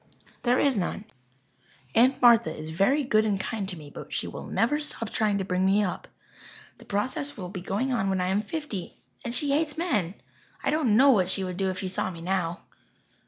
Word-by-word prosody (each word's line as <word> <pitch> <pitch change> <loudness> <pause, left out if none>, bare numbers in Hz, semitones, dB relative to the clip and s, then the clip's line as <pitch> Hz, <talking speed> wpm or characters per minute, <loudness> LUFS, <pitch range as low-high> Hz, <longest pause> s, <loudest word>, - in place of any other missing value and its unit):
"There 245 0 +2
is 270 -7 +2
none. 190 +3 -3 0.9
Aunt 255 +4 +4
Martha 230 -9 +6
is 155 +1 -6
very 255 - +2
good 220 -5 +3
and 205 -3 0
kind 200 -1 -3
to 180 - -7
me, 150 -2 -11
but - - -10
she - - -2
will - - -7
never 295 +7 +1
stop 230 -7 -3
trying 210 -2 +1
to 195 - -1
bring 180 0 0
me 195 +2 +3
up. 185 - -4 0.7
The - - -14
process 255 +7 -2
will 180 -3 -6
be 185 -1 -6
going 210 +8 -1
on 220 -5 0
when 190 -1 0
I 180 0 0
am 195 +2 +1
fifty. 220 - -5 0.3
And 235 +1 -2
she 290 -1 +2
hates 300 +2 +1
men! 210 - 0 0.5
I 275 - +1
don't 275 -9 +2
know 275 +2 +7
what 185 -7 +3
she 190 0 -1
would 180 -1 -4
do 190 0 0
if 185 - -4
she 190 - -3
saw 185 0 -2
me 170 -3 -8
now." 175 -1 -1
205 Hz, 215 wpm, -27 LUFS, 185-255 Hz, 0.9 s, know